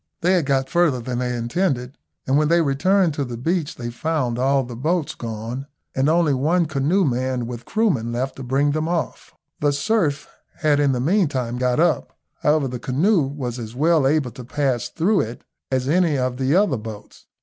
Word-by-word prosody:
They 180 +2 +3
had 170 -7 +1
got 135 -1 +1
further 170 -5 +2
than 120 +1 -3
they 125 -1 -1
intended, 125 +1 -1 0.3
and 135 - +1
when 150 +1 +3
they 170 +2 +4
returned 165 +5 +2
to 145 - -2
the 120 -3 -5
beach 160 +4 -1
they 120 -1 -5
found 125 -3 -1
all 135 +1 +2
the 120 -1 -8
boats 155 +5 -1
gone, 115 +4 -6 0.3
and 135 +3 +1
only 165 -2 +3
one 160 +7 +2
canoe 155 +6 +1
manned 125 -2 -1
with 120 -1 -7
Kroomen 175 - 0
left 130 +3 -2
to 135 - -7
bring 135 +3 +1
them 155 +2 -1
off. 170 -1 -3 0.2
The 145 0 +2
surf 150 -1 0 0.3
had 150 -3 +2
in 140 -2 +3
the 125 - -1
meantime 135 - 0
got 125 +1 +1
up; 175 - +1 0.2
however, 150 -2 +2
the 125 -1 -5
canoe 165 - +2
was 130 -4 -5
as 115 0 -7
well 155 0 +3
able 140 -3 +1
to 125 +2 -10
pass 130 -1 -1
through 190 +5 +2
it 115 +2 -6 0.3
as 130 -1 0
any 165 -1 +2
of 125 -1 -1
the 135 +4 +1
other 190 -9 +3
boats. 110 -1 -10
140 Hz, 195 wpm, -22 LUFS, 125-160 Hz, 0.3 s, they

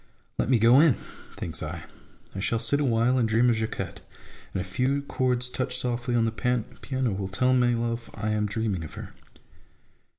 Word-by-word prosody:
Let - - +1
me 130 - +5
go 115 +4 +6
in! 150 -6 +6 0.4
(thinks - - -4
I): - - -5 0.5
I 95 - -5
shall 115 +4 0
sit 115 +6 +1
awhile 125 -2 +2
and 115 -2 +2
dream 120 +3 +4
of 115 - +1
Jacquette, 110 0 -4 0.5
and - - -2
a - - -1
few 130 +9 0
chords 125 -2 0
touched 125 0 -2
softly 120 0 -1
on 115 -1 +3
the 115 - 0
piano 125 +1 -2
will 95 0 -3
tell 125 +7 +2
my 120 -1 +3
love 115 0 -2
I 110 0 -2
am 105 0 +1
dreaming 105 -5 -1
of 80 - -9
her. - - -8
120 Hz, 190 wpm, -27 LUFS, 110-125 Hz, 0.5 s, go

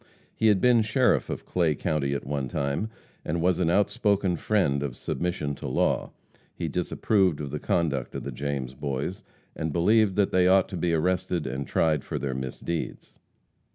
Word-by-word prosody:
He 110 - +2
had 105 -3 +5
been 120 0 +5
sheriff 120 +4 +2
of - - -5
Clay 85 -4 +1
county 70 -2 -1
at - - -4
one 70 -1 -2
time, 70 - -2 0.3
and 85 +3 -2
was 90 +1 +2
an 85 -3 +2
outspoken 100 -1 +2
friend 80 -7 +1
of 70 -4 -3
submission 80 -2 -2
to 70 - -6
law. 65 - +1 0.5
He - - -3
disapproved 95 -8 +1
of 70 -2 -5
the 75 - -3
conduct 70 -8 -1
of - - -4
the - - -4
James 70 -3 -3
boys, 70 +7 -3 0.3
and 80 0 -2
believed 100 +4 +3
that 100 -2 +2
they 90 -1 +4
ought 95 0 +4
to 95 - -5
be 85 0 0
arrested 90 0 0
and 65 +2 -4
tried 80 -3 +1
for - - -4
their 65 -1 -2
misdeeds. 65 +6 -5
85 Hz, 180 wpm, -26 LUFS, 70-95 Hz, 0.5 s, had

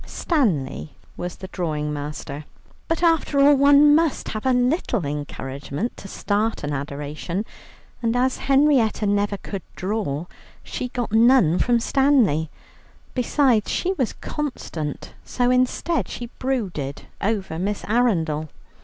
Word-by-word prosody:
Stanley 170 - -1 0.2
was 175 0 -5
the 190 - -9
drawing 150 -5 -2
master. 145 0 -6 0.4
But 330 +1 -1
after 325 -4 +2
all 285 +1 +7
one 285 +1 +6
must 320 -1 +1
have 215 +4 -3
a - - +4
little 250 - +1
encouragement 140 - -4
to 195 - -9
start 205 +2 -1
an 145 0 -2
adoration, 145 +7 -4 0.6
and 230 0 0
as 255 +1 +1
Henrietta 270 -6 +3
never 205 0 +1
could 195 0 -6
draw, 185 -6 -2 0.4
she 250 - -4
got 245 -3 -4
none 225 -7 +5
from 240 -1 +3
Stanley. 235 - +2 0.6
Besides 250 -3 +2
she 370 +2 0
was 260 - -1
constant, 170 - -5
so 245 0 0
instead, 255 +6 +1
she 240 0 -7
brooded 190 - -2 0.2
over 195 -6 -1
Miss 200 +3 -2
Arundel. 170 -10 +1
215 Hz, 125 wpm, -23 LUFS, 155-260 Hz, 0.6 s, all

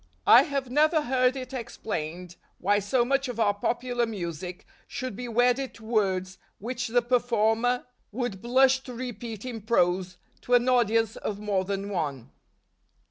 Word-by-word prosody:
I - - +9
have 275 -5 -3
never 310 +3 +3
heard 255 -1 +2
it 255 0 -7
explained 180 -8 -5 0.2
why 205 +3 +2
so 235 +5 +1
much 275 +2 +1
of 245 -2 -5
our 205 -2 +3
popular 240 +3 -1
music 180 -3 -6 0.2
should 255 -6 -5
be 245 +3 -6
wedded 245 +3 +1
to 225 - -14
words 190 -4 0 0.2
which 245 +3 -4
the 240 +1 +2
performer 240 0 +1 0.3
would 225 -4 -3
blush 260 +2 +4
to 250 - -8
repeat 235 -2 -6
in 235 -3 -5
prose 185 -4 +1 0.2
to 245 - +2
an 245 +1 +3
audience 225 -3 +2
of 205 - -4
more 205 -2 -1
than 200 +1 -3
one. 140 - -3
230 Hz, 155 wpm, -27 LUFS, 200-250 Hz, 0.3 s, I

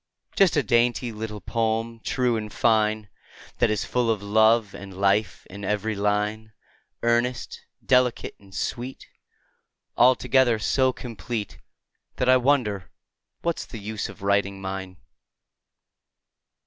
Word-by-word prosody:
Just 190 -5 +4
a 145 - +3
dainty 120 +2 +2
little 105 -1 -6
poem, 115 0 -1
true 125 +1 0
and 105 -1 -4
fine, 110 -2 +2 0.5
That - - +3
is 110 -1 -1
full 125 -2 0
of 105 -3 0
love 110 +1 +3
and 95 -2 -10
life 100 +2 +1
in 100 +2 -10
every 105 +2 -1
line, 105 +2 -1 0.5
Earnest, 120 +1 0 0.2
delicate, 125 -2 +2
and 100 -1 -19
sweet, 125 +6 -4 0.9
Altogether 125 -1 +4
so 130 +4 +2
complete 115 -3 -6 0.6
That 125 - -1
I 130 - +7
wonder 125 -7 +1 0.5
what's 170 -1 -2
the 115 - -8
use 105 0 -4
of - - -12
writing 100 0 +1
mine. 95 -1 -6
110 Hz, 120 wpm, -25 LUFS, 105-120 Hz, 0.9 s, I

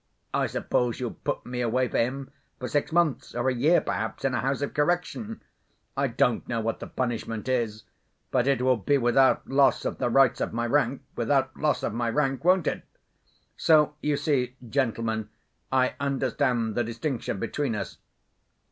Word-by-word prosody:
I - - +1
suppose 120 -2 -1
you'll 125 -2 -2
put - - -4
me 125 0 -3
away 125 +2 +1
for - - -1
him 135 +3 -2 0.3
for 125 - -5
six 145 +3 0
months, 165 -7 +1
or 120 +2 +1
a - - +1
year 145 +8 +4
perhaps, - - -3
in 135 - +1
a 120 - +1
house 135 +1 -1
of 145 - -3
correction. 175 +8 -1 0.5
I 140 0 +1
don't 120 -1 +1
know 115 - 0
what 115 0 -2
the - - -7
punishment 115 -2 -3
is—but 120 +1 -3
it 135 -2 +2
will 130 -1 +4
be 140 +7 +2
without 130 +1 +3
loss 135 0 +3
of - - -3
the - - +1
rights 135 0 +4
of - - -2
my 120 +1 -1
rank, 135 +1 +1
without 130 +2 +1
loss 150 -1 0
of - - -1
my 120 0 -1
rank, 135 +2 0
won't 180 -1 +4
it? - - -1 0.7
So 155 -2 +4
you 150 -1 +1
see, 130 -5 0
gentlemen, 115 -4 -1 0.4
I 130 -1 +2
understand 130 -4 0
the 120 - +1
distinction 115 0 -3
between 140 -1 -2
us.... 100 - -5
130 Hz, 175 wpm, -27 LUFS, 120-140 Hz, 0.7 s, year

